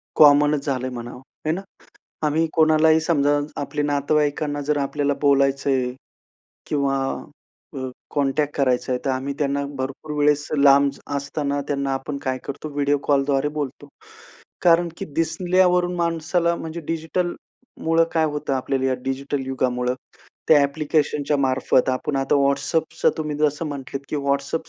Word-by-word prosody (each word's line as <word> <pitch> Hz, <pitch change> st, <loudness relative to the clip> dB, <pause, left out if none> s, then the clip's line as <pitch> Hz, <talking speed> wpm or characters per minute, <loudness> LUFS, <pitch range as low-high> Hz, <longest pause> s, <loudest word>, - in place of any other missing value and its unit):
कॉमनच 145 Hz, -1 st, +5 dB
झालंय 130 Hz, -2 st, -1 dB
म्हणावं, 120 Hz, 0 st, -8 dB, 0.2 s
आहे 155 Hz, -, +2 dB
ना? 190 Hz, -, -4 dB, 0.7 s
आम्ही 160 Hz, +2 st, +1 dB
कोणालाही 155 Hz, 0 st, +5 dB
समजा 145 Hz, -3 st, +2 dB, 0.2 s
आपल्या 145 Hz, +1 st, -2 dB
नातेवाईकांना 145 Hz, 0 st, 0 dB
जर 150 Hz, -, +3 dB
आपल्याला 145 Hz, 0 st, 0 dB
बोलायचंय 135 Hz, -2 st, +2 dB, 0.8 s
किंवा 140 Hz, -2 st, 0 dB, 0.8 s
अ, 130 Hz, -1 st, -3 dB, 0.3 s
कॉन्टॅक्ट 145 Hz, +1 st, 0 dB
करायचाय, 130 Hz, -2 st, +1 dB
तर 135 Hz, -, +1 dB
आम्ही 130 Hz, +2 st, -2 dB
त्यांना 140 Hz, -1 st, 0 dB
भरपूर 135 Hz, +3 st, -5 dB
वेळेस 150 Hz, 0 st, +3 dB
लांब 140 Hz, 0 st, +6 dB, 0.3 s
असताना 140 Hz, 0 st, -2 dB
त्यांना 140 Hz, -1 st, -1 dB
आपण 135 Hz, +2 st, -4 dB
काय 130 Hz, -1 st, -1 dB
करतो 145 Hz, +2 st, -6 dB
व्हिडिओ 145 Hz, 0 st, +1 dB
कॉलद्वारे 140 Hz, 0 st, +2 dB
बोलतो. 145 Hz, 0 st, -5 dB, 0.7 s
कारण 175 Hz, 0 st, +4 dB
की -, -, -5 dB
दिसल्यावरून 180 Hz, +2 st, +2 dB
माणसाला 170 Hz, 0 st, 0 dB
म्हणजे 160 Hz, +1 st, -6 dB
डिजिटलमुळं 165 Hz, 0 st, -1 dB
काय 160 Hz, -1 st, +2 dB
होतं 150 Hz, -2 st, -2 dB
आपल्याला 130 Hz, 0 st, -1 dB
या 130 Hz, -, +1 dB
डिजिटल 135 Hz, +1 st, -3 dB
युगामुळं 125 Hz, -1 st, 0 dB, 0.5 s
त्या 155 Hz, -2 st, +7 dB
ॲप्लिकेशनच्या 145 Hz, 0 st, 0 dB
मार्फत. 130 Hz, -1 st, +2 dB
आपण 135 Hz, +2 st, -2 dB
आता 135 Hz, +1 st, +1 dB
WhatsAppचं 140 Hz, +4 st, +1 dB
तुम्ही 150 Hz, -1 st, -2 dB
जसं 150 Hz, +1 st, +1 dB
म्हटलेत 135 Hz, -1 st, -5 dB
की -, -, -2 dB
WhatsApp 140 Hz, +3 st, -1 dB
145 Hz, 130 wpm, -22 LUFS, 135-155 Hz, 0.8 s, त्या